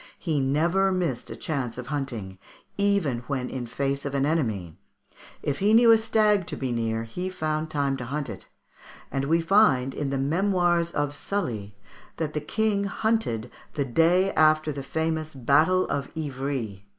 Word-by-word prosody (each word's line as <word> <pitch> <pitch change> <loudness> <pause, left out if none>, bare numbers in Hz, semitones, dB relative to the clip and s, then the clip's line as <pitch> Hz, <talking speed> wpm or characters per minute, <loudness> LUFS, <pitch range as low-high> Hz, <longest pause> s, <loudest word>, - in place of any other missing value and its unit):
He 160 -5 -1
never 170 +8 +2
missed 170 -10 -2
a - - -6
chance 130 -7 -3
of 125 - -5
hunting, 115 -10 -4 0.4
"even 200 -11 +1
when 130 -3 -2
in 125 -2 -4
face 140 +3 -2
of 140 -1 -3
an 140 0 +2
enemy. 110 - -1 0.6
If 145 -1 -1
he 210 +3 +4
knew 230 0 +7
a 225 - +8
stag 215 -4 +2
to - - -4
be 130 -2 -3
near, 115 -1 -1
he 180 +12 -4
found 155 -3 -2
time 140 -3 0
to 125 - -6
hunt 140 +3 -3
it," - - -9 0.6
and 135 0 -1
we 165 +3 +2
find 165 -9 +4
in 145 0 -2
the 135 - -1
"Memoirs 175 +3 +2
of 145 -3 -1
Sully 115 - -3 0.2
" - - -24
that 155 -2 -2
the 150 - -2
King 200 +5 0
hunted 200 - -1 0.2
the 145 -2 0
day 170 +9 +3
after 155 0 +4
the 140 -1 -5
famous 160 +1 -2
battle 155 +9 +3
of 140 -1 -3
Ivry. 130 -9 -4
150 Hz, 175 wpm, -26 LUFS, 130-175 Hz, 0.6 s, a